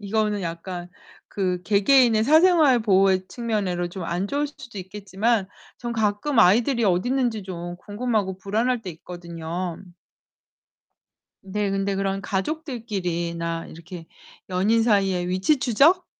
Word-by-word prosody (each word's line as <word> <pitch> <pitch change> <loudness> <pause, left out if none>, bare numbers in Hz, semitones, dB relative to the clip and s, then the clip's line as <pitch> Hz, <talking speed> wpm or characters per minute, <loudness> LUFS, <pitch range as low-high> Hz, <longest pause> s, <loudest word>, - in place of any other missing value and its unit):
이거는 210 -1 -1
약간 175 +1 -6 0.4
그 180 -3 -2
개개인의 220 +2 +4
사생활 310 -4 +5
보호의 190 -3 +3
측면으로 200 -7 -2
좀 180 -1 -7
안 175 +4 -2
좋을 290 +1 0
수도 245 -7 -11
있겠지만 200 +2 -1 0.3
전 240 -1 -4
가끔 220 +4 0
아이들이 235 +5 +4
어딨는지 225 +4 +1
좀 175 -1 -6
궁금하고 205 -2 -2
불안할 225 +5 -1
때 185 - -5
있거든요. 170 +1 -6 1.6
네, 200 +1 -2
근데 195 0 -1
그런 195 0 -1
가족들끼리나 190 - -3
이렇게 170 0 -10 0.4
연인 205 +5 +2
사이의 195 -5 +1
위치 190 +11 +2
추적? 285 - +3
200 Hz, 285 characters per minute, -24 LUFS, 180-235 Hz, 1.6 s, 사생활